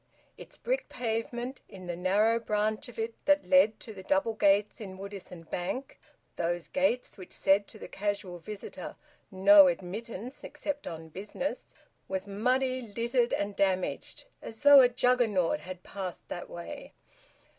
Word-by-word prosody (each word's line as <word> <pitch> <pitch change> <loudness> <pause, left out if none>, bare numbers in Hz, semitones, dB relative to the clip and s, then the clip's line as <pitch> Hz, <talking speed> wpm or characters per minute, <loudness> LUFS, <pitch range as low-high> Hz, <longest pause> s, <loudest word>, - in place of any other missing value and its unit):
Its - - -10
brick - - -2
pavement, 240 +2 -3
in 190 -3 -11
the 175 -1 -3
narrow 205 +6 +2
branch 215 0 -1
of 245 - -13
it 225 +1 -2
that 290 0 +4
led 275 -6 +5
to 220 - -9
the 195 - -9
double 195 +4 +1
gates 205 +1 +2
in 190 -3 -7
Woodisun 195 -3 -8
Bank 255 +10 -4 0.4
(those 175 0 -1
gates 265 -6 0
which 185 - -10
said 195 +1 +3
to - - -12
the - - -9
casual 200 -3 -3
visitor, 210 +4 -8 0.4
`No 195 0 +8
Admittance 215 +7 -7
except 290 -1 -5
on 160 -1 -7
Business'), 210 - -5 0.3
was 190 +1 -3
muddy, 255 +5 +1
littered, 235 +2 0
and 200 0 -1
damaged, 190 - -1 0.2
as 220 - -8
though 285 -1 +9
a 250 - +6
Juggernaut 240 -8 +2
had 185 0 -9
passed 190 -3 -6
that 175 - -6
way. 170 0 -8
210 Hz, 150 wpm, -30 LUFS, 190-240 Hz, 0.4 s, though